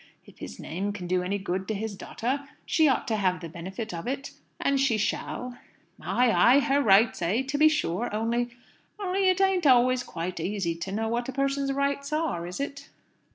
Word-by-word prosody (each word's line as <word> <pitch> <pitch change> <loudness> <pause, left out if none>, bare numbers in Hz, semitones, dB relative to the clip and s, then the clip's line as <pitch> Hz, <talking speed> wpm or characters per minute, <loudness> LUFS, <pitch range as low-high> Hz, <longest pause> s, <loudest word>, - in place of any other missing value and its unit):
If - - -18
his 70 - -8
name 195 +6 -3
can 190 -3 -6
do 180 +1 +1
any 190 +3 -1
good 190 -1 -3
to 220 - -2
his 215 0 -4
daughter, 270 +8 -3 0.2
she 315 -2 +3
ought 265 - +1
to 220 - 0
have 185 -4 +1
the 170 - -7
benefit 190 +7 -6
of 165 +4 -5
it 275 +2 -3 0.3
and 275 0 +1
she 265 -5 +2
shall." 245 +3 -3 0.4
"Ay, 250 -1 +2
ay. 245 +4 +6
Her 280 0 +2
rights, 215 -2 +4
eh? 200 +10 +1
To 270 +2 -4
be 310 0 +7
sure. 240 - -1
Only 230 +3 0 0.5
only 385 -1 +1
it 370 0 +2
ain't 385 -4 +3
always 255 0 +5
quite 175 -5 -5
easy 180 0 -1
to 170 +3 -6
know 220 +3 -1
what 240 +2 -2
a - - -1
person's 275 +1 0
rights 280 +1 -1
are, 305 - -1
is 180 +6 -6
it?" 280 0 -5
235 Hz, 200 wpm, -27 LUFS, 190-275 Hz, 0.5 s, be